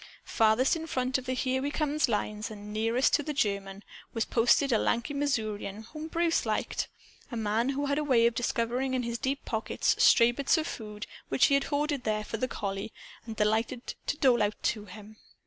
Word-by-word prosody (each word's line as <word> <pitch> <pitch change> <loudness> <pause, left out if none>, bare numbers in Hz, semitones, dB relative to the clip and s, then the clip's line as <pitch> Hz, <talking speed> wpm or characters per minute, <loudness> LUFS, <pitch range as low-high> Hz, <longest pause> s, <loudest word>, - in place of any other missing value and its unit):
Farthest 225 +7 +3
in 325 0 -5
front 255 -3 0
of 255 - -11
the 255 - 0
"Here 260 0 0
We 285 - -1
Comes" 300 -1 0
lines 210 0 -2
and 210 -1 -9
nearest 225 +4 +1
to - - +4
the 300 0 -4
German 200 -3 -1 0.3
was 225 - 0
posted 245 +4 +3
a 225 - +3
lanky 235 +5 0
Missourian 220 -7 -2
whom 305 +7 -8
Bruce 335 0 +1
liked, - - -1 0.4
a 240 - -4
man 220 +3 0
who 280 +1 -1
had 285 +1 0
a - - -1
way 250 -5 +4
of 235 - +3
discovering 245 +2 -1
in 250 - 0
his 235 0 -3
deep 275 +3 -2
pockets 220 -1 0
stray 235 0 +6
bits 280 +6 +1
of 315 - -1
food 210 -6 -6 0.2
which - - +4
he - - +2
had 275 0 +3
hoarded 290 -2 -1
there 215 -2 -1
for 225 - -5
the 255 - -1
collie 200 -1 -4 0.4
and 225 - -5
delighted 220 +3 0
to 285 - -1
dole 255 -4 +4
out 210 0 +1
to 210 -2 -1
him. 210 +2 -12
235 Hz, 205 wpm, -29 LUFS, 215-275 Hz, 0.4 s, stray